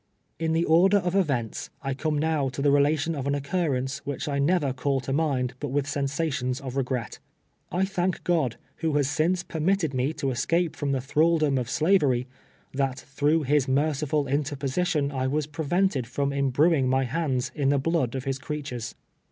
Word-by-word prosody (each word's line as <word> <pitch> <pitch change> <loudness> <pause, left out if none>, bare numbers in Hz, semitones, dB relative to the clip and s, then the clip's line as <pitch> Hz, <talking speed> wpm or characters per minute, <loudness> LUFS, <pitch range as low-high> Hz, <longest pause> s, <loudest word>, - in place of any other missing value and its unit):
In 160 0 0
the 165 +1 +2
order 185 +5 +5
of 180 -2 -1
events, 140 - 0
I 135 -1 -1
come 150 +3 -1
now 150 -3 +1
to 130 +2 -5
the 145 - +4
relation 145 +3 +2
of 140 -3 -3
an 140 - +1
occurrence, 140 -3 -1
which 145 +2 -5
I 140 -1 -1
never 145 -2 +2
call 135 +1 0
to 135 +2 -3
mind 135 -5 0
but 145 - -3
with 140 +1 0
sensations 140 -2 -1
of 130 -2 -6
regret. 130 -3 -2 0.5
I 185 +2 +1
thank 185 -2 -1
God, 155 -10 +1 0.2
who 160 -2 -1
has 145 -2 +2
since 170 +5 +1
permitted 165 -1 0
me 130 +3 0
to 140 -4 -2
escaj)e 165 +7 0
from 145 -2 -2
the 135 -2 0
thralldom 150 0 +2
of 120 -1 -4
slavery, 150 -8 +2 0.5
that 135 -1 0
through 145 +4 0
his 140 0 +2
merciful 145 +1 +1
interposition 145 +2 0
I 130 -2 -1
was 150 +2 0
prevent 160 +5 0
ed 125 -3 -2
from 140 +3 -1
imbruing 140 +2 +2
my 130 +1 +2
hands 130 -1 -1
in 140 -3 +1
the 140 - +3
blood 140 -3 0
of 130 - -3
his 135 -1 -2
crea 150 +1 -4
tures. 125 -5 -6
145 Hz, 185 wpm, -26 LUFS, 135-160 Hz, 0.5 s, order